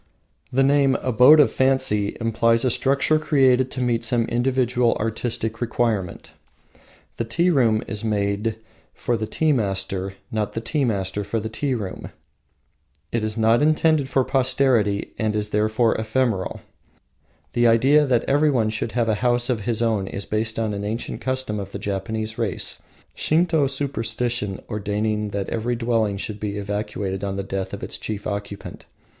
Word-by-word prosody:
The 135 +2 +3
name, 140 -1 +3
Abode 130 +5 +6
of 145 - +5
Fancy, 130 -6 +1
implies 115 +1 +2
a 125 - +2
structure 140 +5 +2
created 130 -4 +3
to 130 - -3
meet 120 -1 0
some 115 0 +2
individual 125 0 +1
artistic 115 +1 -2
requirement. 110 -6 -1 0.9
The - - -1
tea 170 +11 +1
room 115 -8 +3
is 105 0 -4
made 105 0 -1 0.4
for 120 - -1
the 110 -1 -3
tea 160 +6 +1
master, 95 -5 -2 0.2
not 105 -2 -2
the - - -2
tea 135 +5 -1
master 100 -2 -1
for 105 +3 -2
the 110 +1 -4
tea 130 +4 -1
room. 100 -5 -6 1.0
It 115 -2 -1
is 110 +1 -3
not 115 +2 +3
intended 155 -2 +2
for 130 0 +2
posterity 125 -6 +1
and 110 -1 0
is 105 0 -2
therefore 110 +2 +2
ephemeral. 110 -3 -1 0.9
The 120 0 +3
idea 135 +6 +4
that 125 -3 +2
everyone 135 -6 +2
should 110 +1 -3
have 120 -2 +1
a 110 - +2
house 120 0 +1
of 110 -5 -3
his 115 -1 0
own 110 -4 0
is 100 - -6
based 110 +1 -2
on 110 -2 -1
an 100 0 -4
ancient 110 +3 -4
custom 130 -5 -2
of 100 -1 -6
the - - -3
Japanese 110 +3 -4
race, 105 -7 -2 0.3
Shinto 160 -2 +2
superstition 120 -6 -2
ordaining 105 0 -2
that 100 -1 -3
every 120 +2 -1
dwelling 115 -4 0
should 105 +1 -5
be 105 -1 -3
evacuated 100 -1 -3
on 100 -1 -2
the 100 - -3
death 95 -1 -4
of - - -7
its - - -6
chief 105 -2 -5
occupant. 100 -1 -6
115 Hz, 160 wpm, -23 LUFS, 105-130 Hz, 1.0 s, Abode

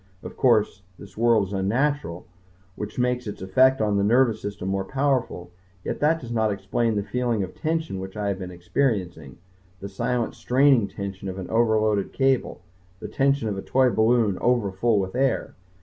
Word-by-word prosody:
Of - - -8
course, 110 -6 +2 0.2
this 100 -1 -13
world 115 -2 +3
is - - -7
unnatural, 105 - -1 0.5
which 105 +2 -7
makes 125 -1 0
its 105 - -6
effect 130 +7 +3
on 105 -1 +1
the 100 - +1
nervous 115 0 +3
system 100 -2 -5
more 95 0 -1
powerful, 130 -8 -1 0.3
yet - - -4
that 160 +2 +2
does 120 -4 -9
not 110 -2 +1
explain 105 +3 -1
the 100 - -1
feeling 120 -2 -1
of 95 - -7
tension 160 - -2
which 95 +2 -8
I 105 -1 -1
have 95 -1 -3
been 90 -1 -6
experiencing, 90 - -2 0.4
the 100 - -6
silent 115 +4 -2
straining 130 -4 +3
tension 100 0 -6
of 95 - -6
an 95 - -7
overloaded 110 -3 +1
cable, 135 -2 0 0.4
the - - -6
tension 140 -3 +1
of 100 -2 -3
a - - -4
toy 130 +2 +2
balloon 110 -3 +2
overfull 115 -2 +1
with 95 -1 -3
air. 135 +1 0
110 Hz, 180 wpm, -24 LUFS, 95-125 Hz, 0.5 s, world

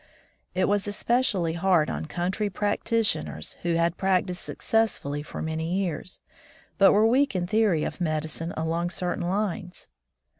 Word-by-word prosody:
It 185 0 +2
was 205 0 +1
especially 205 -5 +1
hard 170 -2 +3
on - - -4
country 185 +6 -1
practitioners 210 +3 -1
who 170 -1 0
had 170 +1 +1
prac 190 -1 +2
tised 180 -2 -4
successfully 210 -10 -1
for 150 - -6
many 160 +2 -2
years, 185 -2 -3 0.6
but 195 -1 +8
were 210 +2 +4
weak 260 +1 +3
in 180 -1 0
theory 200 -5 +2
of - - -4
medicine 155 0 -2
along 165 +2 -1
certain 175 0 -2
lines. 190 -2 -3
180 Hz, 145 wpm, -26 LUFS, 165-205 Hz, 0.6 s, but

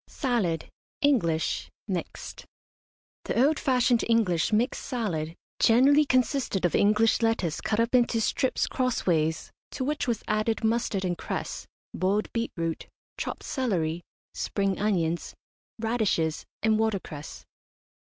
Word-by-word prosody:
SALAD, 215 - -1 0.4
ENGLISH, 170 - +1 0.2
MIXED. 185 -4 -5 0.8
The 245 - +3
old 305 +1 +2
fashioned 250 -3 +2
English 200 -8 +2
mixed 225 +5 +1
salad 170 - -3 0.2
generally 275 +6 +5
consisted 255 -7 +1
of 175 - +1
English 215 +3 +3
lettuce 225 -8 0
cut 215 - -1
up 230 +2 +1
into 240 -2 +3
strips 260 +4 +1
crossways, 170 - 0 0.2
to - - -4
which 295 +1 -1
was 235 -3 -1
added 215 +2 0
mustard 220 -4 0
and 175 -2 -2
cress, - - -4 0.3
boiled 195 +4 0
beetroot, 170 -8 -3 0.3
chopped - - -4
celery, 175 - -1 0.3
spring 195 -2 -1
onions, 175 -5 0 0.4
radishes, 220 -9 0 0.2
and 220 0 +3
watercress. 195 -9 -3
220 Hz, 115 wpm, -27 LUFS, 175-245 Hz, 0.8 s, generally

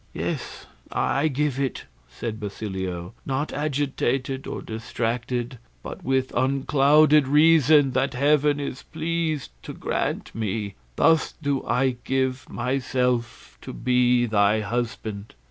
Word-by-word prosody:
"Yes, - - -4 0.3
I 140 +5 +1
give 145 -2 -1
it," 135 -2 -2 0.2
said 110 -2 -5
Basilio, 95 -4 -5
"not 135 +2 -2
agitated 135 -2 -1
or - - -5
distracted, 120 +2 -3 0.2
but - - -8
with 130 0 0
unclouded 140 +3 +4
reason 150 -1 +5
that 130 0 0
heaven 145 +2 +3
is 140 -2 -4
pleased 160 - -2
to - - -8
grant - - -3
me, 105 -2 -3 0.2
thus 160 - +3
do 140 -3 -2
I 130 -1 +1
give 130 -1 -1
myself 125 - -2
to - - -8
be 125 -1 +2
thy 105 -1 +3
husband." 110 - -4
130 Hz, 115 wpm, -24 LUFS, 115-145 Hz, 0.3 s, reason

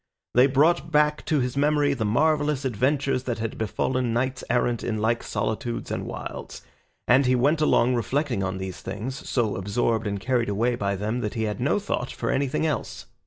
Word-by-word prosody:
They 125 +2 +6
brought 155 +3 +2
back 150 0 +2
to 150 -4 +2
his 125 +1 -2
memory 145 0 +2
the 115 -5 -2
marvellous 145 +4 +1
adventures 130 +2 0
that 120 -2 -2
had 110 0 -3
befallen 120 +3 -1
knights 130 +2 -1
errant 120 -1 +1
in 110 -2 -1
like 115 +2 +1
solitudes 115 +2 -3
and - - -3
wilds, - - -7 0.4
and 130 +2 +5
he 130 - +4
went 145 +6 +2
along 125 -4 +3
reflecting 125 -1 0
on 95 0 -2
these 95 -1 -6
things, 130 +7 -6
so 115 -5 +1
absorbed 110 +3 0
and 100 -1 -2
carried 120 +1 0
away 115 +5 +1
by 100 -4 -1
them 105 +5 -2
that 105 -3 -3
he 110 - -1
had 105 -1 -2
no 130 +10 +2
thought 195 -11 -2
for - - -2
anything 140 +3 0
else. 155 - -3
125 Hz, 190 wpm, -25 LUFS, 110-140 Hz, 0.4 s, They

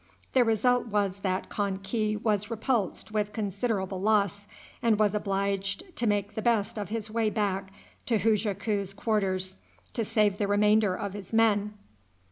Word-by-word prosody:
The 255 - +6
result 240 +2 +2
was 200 -3 0
that 190 -1 -2
Kan 200 -2 -1
ki 215 +1 0
was 210 -1 0
repulsed 225 -3 -1
with 210 -1 -1
considerable 200 -2 -2
loss, 205 -1 +1 0.3
and 225 -2 +3
was 210 -1 +3
obliged 200 - -2
to 240 - -1
make 205 0 0
the 220 - -3
best 220 -2 +1
of 205 - -4
his 220 -1 -4
way 225 -1 +1
back 195 -2 -1 0.4
to 230 - +3
Hujaku's 205 -2 0
quarters 190 - 0 0.4
to 230 - -1
save 210 -2 +2
the 205 - +1
remainder 210 -1 +3
of 200 0 -4
his 200 -3 -8
men. 210 -2 +3
210 Hz, 155 wpm, -28 LUFS, 200-220 Hz, 0.4 s, The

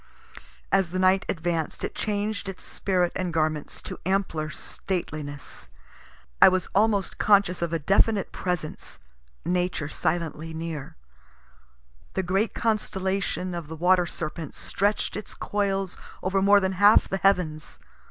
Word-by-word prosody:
As 195 -3 +3
the 185 - -3
night 185 +1 +3
advanc'd 165 -2 -2
it - - -2
changed 205 -1 -2
its 190 - -8
spirit 180 -3 0
and 185 -2 -1
garments 155 -2 -1
to - - -7
ampler 175 -5 0
stateliness. 150 - -5 0.7
I - - +11
was 185 0 0
almost 205 -1 +2
conscious 200 -4 +4
of 170 -1 -1
a 165 - +1
definite 195 +6 +2
presence, 180 -4 -4 0.5
Nature 180 -4 0
silently 160 -1 -2
near. 160 -3 -5 1.2
The 190 - +1
great 195 +5 0
constellation 195 -4 -1
of 170 -3 -5
the 160 - -6
Water 180 +2 +3
Serpent 155 -2 -5
stretch'd 205 +2 -1
its 210 - -7
coils 195 -2 -1 0.2
over 190 +1 +1
more 200 +1 +6
than 190 -1 0
half 205 +3 +6
the 195 - -1
heavens. 180 -6 +1
185 Hz, 135 wpm, -26 LUFS, 165-195 Hz, 1.2 s, I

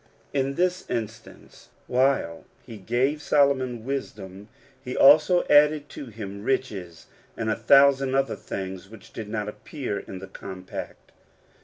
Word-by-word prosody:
In 135 -1 0
this 180 +2 -1
instance, 115 -1 -7 0.2
while 125 -10 0 0.2
he 115 - -9
gave 125 +9 0
Solomon 130 -6 +1
wisdom, 105 -7 -6 0.3
he 125 -1 -5
also 155 +5 +6
added 150 0 +4
to 140 - -8
him 100 -3 -8
riches, 100 -10 -3 0.3
and 110 -1 -1
a - - +1
thousand 135 -1 +4
other 135 -3 +1
things 95 0 -7
which 110 -3 -15
did 110 -2 -7
not 105 -1 -3
appear 115 0 -5
in 95 - -9
the 95 - -8
compact. 95 -1 -9
125 Hz, 135 wpm, -25 LUFS, 100-140 Hz, 0.3 s, also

